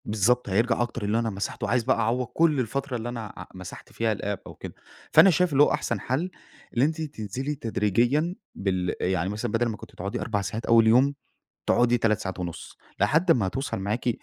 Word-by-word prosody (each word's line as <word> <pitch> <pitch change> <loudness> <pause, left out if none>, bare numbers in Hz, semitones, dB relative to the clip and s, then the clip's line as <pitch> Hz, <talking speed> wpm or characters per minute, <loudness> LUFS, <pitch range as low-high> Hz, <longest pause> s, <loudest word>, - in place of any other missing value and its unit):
بالضبط، 110 +3 +1
هيرجع 115 +5 +2
أكتر 120 -2 -3
اللي 105 +3 +1
أنا 115 -1 0
مسحته، 100 -1 -4
وعايز 120 -1 +1
بقى - - +2
أعوض 125 +3 +1
كل 160 -1 +2
الفترة 130 +3 -2
اللي 115 +1 -5
أنا 115 -4 -6
ع - - -7
مسحت 95 -1 -10
فيها 115 -1 0
الapp 100 0 -3
أو - - -10
كده، - - -8 0.4
فأنا 195 - +8
شايف 180 0 +2
اللي 140 +2 +6
هو - - +3
أحسن - - -1
حل 160 +9 -2 0.4
اللي 120 +3 +3
أنتِ 160 +1 -2
تنزلي 135 0 -4
تدريجيًا 120 - +1 0.2
بال 95 -2 -1
يعني 95 -1 0
مثلًا 105 +3 -3
بدل 115 +2 +1
ما 110 -2 -3
كنتِ - - -12
بتقعدي 100 +3 -4
4 105 -3 -1
ساعات 110 +4 -4
أول 115 -1 +5
يوم، 130 +5 +5 0.5
تقعدي 120 0 +4
3 110 -3 +1
ساعات 95 -1 -5
ونص 90 -2 -6 0.2
لحد 160 - +3
ما 110 -10 +3
توصل 135 +9 -3
معاكِ 105 +6 -1
115 Hz, 200 wpm, -26 LUFS, 105-130 Hz, 0.5 s, فأنا